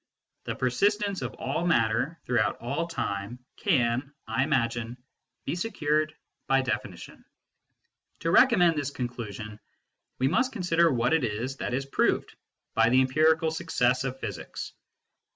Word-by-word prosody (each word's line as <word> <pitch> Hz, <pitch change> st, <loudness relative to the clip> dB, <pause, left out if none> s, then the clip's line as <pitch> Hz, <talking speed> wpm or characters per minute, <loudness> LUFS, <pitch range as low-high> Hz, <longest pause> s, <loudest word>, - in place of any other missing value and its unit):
The -, -, -3 dB
persistence 200 Hz, -, +1 dB
of -, -, -4 dB
all 150 Hz, +6 st, -2 dB
matter 125 Hz, +2 st, +1 dB
throughout 120 Hz, -3 st, +1 dB
all 140 Hz, +8 st, -2 dB
time 100 Hz, -8 st, -3 dB, 0.2 s
can, 125 Hz, +3 st, +1 dB
I 115 Hz, +4 st, 0 dB
imagine, 120 Hz, -4 st, -1 dB, 0.5 s
be -, -, -1 dB
secured 155 Hz, -5 st, 0 dB, 0.3 s
by 135 Hz, 0 st, +3 dB
definition. 105 Hz, -7 st, -5 dB, 1.0 s
To 165 Hz, -, 0 dB
recommend 180 Hz, -8 st, +5 dB
this 145 Hz, -2 st, -1 dB
conclusion, 110 Hz, -5 st, -6 dB, 0.6 s
we 130 Hz, -, +2 dB
must 255 Hz, -, +1 dB
consider 170 Hz, -5 st, +3 dB
what 125 Hz, +1 st, +1 dB
it 160 Hz, -, +2 dB
is 120 Hz, +4 st, -2 dB
that 125 Hz, -, -2 dB
is 135 Hz, +1 st, -2 dB
proved 135 Hz, -, 0 dB, 0.4 s
by -, -, +4 dB
the 130 Hz, +2 st, +5 dB
empirical 155 Hz, +4 st, +3 dB
success 125 Hz, -4 st, +1 dB
of 135 Hz, 0 st, -4 dB
physics. -, -, -6 dB
135 Hz, 135 wpm, -27 LUFS, 120-160 Hz, 1.0 s, recommend